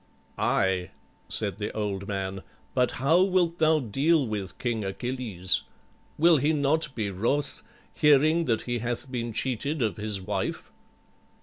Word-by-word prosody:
_'" - - -36 0.4
"Aye," 95 -2 +1 0.4
said 100 -2 -3
the 105 - -3
old 100 -2 -2
man, 95 -1 -3 0.3
"but 125 -1 +2
how 160 +7 +3
wilt 180 -3 +2
thou 160 0 +4
deal 140 +6 +2
with 105 -4 -4
King 115 -3 -2
Achilles? 105 -3 -1 0.6
Will 165 +1 +6
he 145 +4 +2
not 150 0 +1
be 105 -3 -2
wroth, 125 +10 -1 0.3
hearing 155 +3 +4
that 115 -5 0
he 120 -1 -2
hath 120 +2 -3
been 120 -2 -3
cheated 130 +5 -1
of 110 - -1
his 105 -2 0
wife?" 95 - -3
120 Hz, 145 wpm, -27 LUFS, 105-150 Hz, 0.6 s, Will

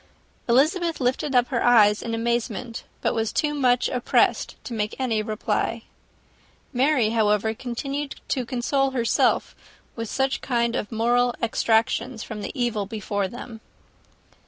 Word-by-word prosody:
Elizabeth 325 +7 +2
lifted 260 +2 0
up 245 0 +4
her 245 -4 0
eyes 215 -4 +5
in 230 -1 -3
amazement, 235 0 -2 0.2
but - - +1
was 225 -1 -1
too 295 -1 0
much 250 -4 +2
oppressed 250 -1 +1
to 240 - -6
make 210 -1 -2
any 235 -5 0
reply. 215 0 -2 0.9
Mary, 255 -3 +2
however, 220 -1 +2
continued 275 +5 -4
to 260 - 0
console 265 +3 0
herself 230 -1 +1 0.4
with 230 -2 -5
such 265 -1 0
kind 235 -2 0
of 205 - -3
moral 240 +2 +2
extractions 225 +1 +1
from 215 -1 -7
the - - -4
evil 225 -5 0
before 205 -2 -2
them. 230 +1 -9
235 Hz, 135 wpm, -24 LUFS, 220-255 Hz, 0.9 s, eyes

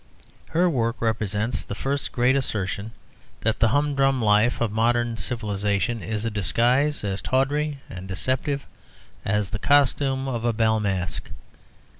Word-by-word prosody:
Her 175 +3 +3
work 120 -7 0
represents 110 0 -1
the 100 - -6
first 140 +5 -2
great 125 +1 +3
assertion 105 -5 -2 0.5
that 110 0 0
the 115 - +5
humdrum 135 +1 +2
life 110 +1 +3
of 115 -3 0
modern 120 +1 +1
civilisation 105 -1 -1
is 110 0 -3
a 115 - -1
disguise 120 - +1
as 100 -1 -2
tawdry 140 +2 0
and 95 +1 -8
deceptive 130 +8 -2 0.6
as 105 -1 0
the 105 - -3
costume 135 0 +2
of 120 -3 -3
a 120 -1 +1
bal 110 0 +2
masqué. 95 -3 -2
115 Hz, 140 wpm, -24 LUFS, 105-135 Hz, 0.6 s, the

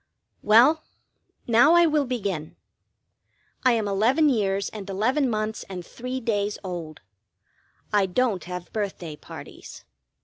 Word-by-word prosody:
Well, 250 +9 +5 0.6
now 245 +8 +5
I 345 0 +6
will 305 -3 +2
begin. 200 -11 -3 1.1
I 255 -2 +5
am 220 -3 0
eleven 240 +10 +3
years 200 -5 0
and 205 -2 -8
eleven 250 +8 +1
months 215 -1 -2
and 180 -2 -6
three 250 +6 -5
days 210 -4 -1
old. 170 -5 -6 0.9
I 200 -2 +3
don't 205 0 0
have 180 0 -7
birthday 190 -7 -4
parties. - - -11
215 Hz, 125 wpm, -25 LUFS, 195-255 Hz, 1.1 s, I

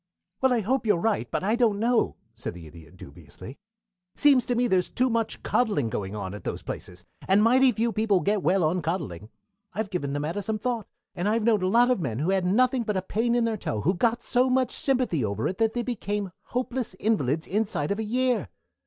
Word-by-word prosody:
"Well, 265 0 +4
I 240 -2 +2
hope 250 +3 0
you 205 - +5
are - - -2
right, 220 +2 0
but - - -2
I 215 +4 +2
don't 225 -4 +2
know," 235 +1 +1 0.2
said 115 -5 -6
the 85 -2 -10
Idiot 80 +2 -14
dubiously. 80 - -12 0.6
"Seems 280 -4 +4
to 245 - 0
me 245 +1 +2
there's 185 -4 +1
too 255 0 +1
much 225 -1 -2
coddling 150 - +1
going 100 0 -4
on 95 -2 -5
at 105 - -8
those - - -4
places, 90 0 -7 0.2
and 195 +2 +4
mighty 255 +3 +5
few 230 +1 0
people 215 -3 +2
get 205 0 +1
well 185 0 +2
on 170 +4 +1
coddling. 150 - -4 0.5
I've 210 -1 -3
given 145 -7 -2
the 145 - -1
matter 165 +7 -2
some 215 +2 -2
thought, 235 0 -3 0.3
and 185 +2 -1
I've 225 +1 +1
known 215 -3 +3
a 185 - +1
lot 240 +5 +4
of 250 - +1
men 115 -8 -2
who 155 +8 0
had 190 -2 +1
nothing 250 +6 +3
but 210 -3 -1
a 185 - -2
pain 235 +5 0
in 240 - +2
their 225 -1 0
toe 110 - -3
who 175 - +2
got 235 +5 0
so 250 +1 +2
much 255 -1 +2
sympathy 255 - 0
over 105 +1 -1
it 185 - -4
that 225 -1 +2
they 240 - 0
became 205 -5 -3
hopeless 250 -4 -3
invalids 160 - 0
inside 200 -7 -1
of 200 - -1
a - - -1
year. 245 - 0
210 Hz, 230 wpm, -26 LUFS, 160-235 Hz, 0.6 s, you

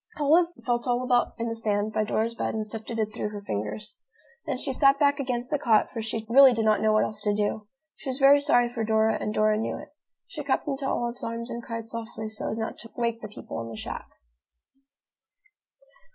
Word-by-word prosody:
Olive 320 +4 +5 0.2
felt 240 +1 0
all 245 0 +1
about 250 -1 +2
in 230 +1 -2
the 230 - -2
sand 215 -1 -1
by 215 - +1
Dora's 220 +2 0
bed 230 - -2
and 215 -1 -2
sifted 225 +1 -5
it 215 -1 -1
through 210 - -3
her 205 -1 -7
fingers. 205 - -4 0.5
Then 275 -4 -1
she 270 +1 -3
sat 275 +1 +5
back 285 0 +3
against 250 -1 -1
the 295 - +1
cot, 225 -6 +3
for 230 - -4
she 220 0 -4
really 265 +2 +8
did 225 -1 0
not 215 -1 +3
know 220 0 +3
what 215 - +4
else 215 -1 -4
to 205 0 +1
do. 210 0 -1 0.3
She 275 - -7
was 260 - -2
very 280 +1 +7
sorry 245 -4 +3
for 235 -1 -3
Dora, 220 0 +2
and 210 - -2
Dora 215 0 +2
knew 225 - -2
it. 300 - -11 0.4
She 300 - -7
crept 275 +1 0
into 275 -1 -2
Olive's 240 +1 -2
arms 230 +1 -4
and 235 - -4
cried 230 -1 -6
softly, 225 -1 -5
so 215 - -4
as 220 - -3
not 220 0 -4
to 230 - -11
wake 235 -1 -1
the 215 - -6
people 205 - -7
in 115 - -6
the 115 - -8
shack. - - -6
230 Hz, 225 wpm, -27 LUFS, 215-255 Hz, 0.5 s, really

